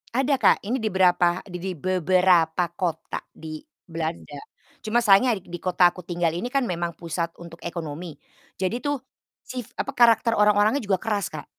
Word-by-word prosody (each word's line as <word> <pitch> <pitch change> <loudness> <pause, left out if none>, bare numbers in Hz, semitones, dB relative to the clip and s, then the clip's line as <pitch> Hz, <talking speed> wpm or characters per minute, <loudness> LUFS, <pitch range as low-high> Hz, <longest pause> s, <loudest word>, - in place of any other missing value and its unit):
Ada 265 +4 +1
Kak, 205 - +6
ini 245 +4 -1
di 220 - 0
berapa 180 -2 +2
di 180 -3 -7
di 190 +1 -3
beberapa 180 -1 +2
kota 175 -3 -3
di 155 -1 -8 0.2
Belanda, 160 -3 -5 0.4
cuma 225 +2 +2
sayangnya 225 +1 +4
di 175 -1 -9
kota 180 -1 +4
aku 180 - -9
tinggal 170 -2 -1
ini 225 +8 -3
kan 275 -1 +1
memang 170 -1 -3
pusat 170 0 -3
untuk 170 -1 -11
ekonomi, 165 -1 -6 0.4
jadi 195 +6 -1
tuh 290 -1 0 0.5
si, 250 -1 -5 0.2
apa 275 - -2
karakter 230 -1 +5
orang-orangnya 210 +5 +3
juga 195 -3 0
keras, 205 -4 -2
Kak. 155 -1 -7
185 Hz, 165 wpm, -24 LUFS, 170-215 Hz, 0.5 s, Kak